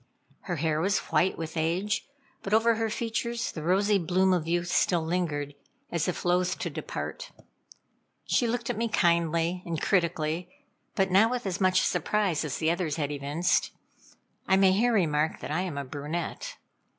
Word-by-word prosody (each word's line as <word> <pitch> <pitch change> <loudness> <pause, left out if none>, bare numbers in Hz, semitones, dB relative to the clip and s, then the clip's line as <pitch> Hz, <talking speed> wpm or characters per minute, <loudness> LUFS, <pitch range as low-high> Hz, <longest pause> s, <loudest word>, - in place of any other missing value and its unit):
Her 175 - -2
hair 155 0 0
was 195 +3 +2
white 185 - +2
with 160 0 -5
age, 175 +7 -1 0.3
but 200 +2 +1
over 230 +1 +4
her 225 0 -1
features, 235 +1 -2
the 160 - -6
rosy 195 +5 +2
bloom 185 +2 +2
of 165 -3 0
youth 175 +1 0
still 175 -2 +2
lingered, 155 -4 -2 0.4
as 170 0 0
if 180 - -3
loth 180 +1 +2
to - - -4
depart. - - -5 1.0
She 240 - +2
looked 235 0 -1
at - - -5
me 230 - +1
kindly 170 -2 +1
and 165 -2 -3
critically, 170 -2 0 0.5
but 190 -2 +1
not 205 +5 +5
with 245 -1 -3
as 190 0 -3
much 185 0 +4
surprise 180 -1 0
as 150 -4 -3
the 160 0 +1
others 170 -3 -1
had 150 -3 -2
evinced. 145 +5 0 0.7
I 190 - +4
may 190 -1 +5
here 230 +6 +3
remark 160 -7 +1
that - - -6
I 160 +4 0
am 180 -6 -4
a 140 - -3
brunette. 165 - -5
175 Hz, 175 wpm, -28 LUFS, 160-200 Hz, 1.0 s, not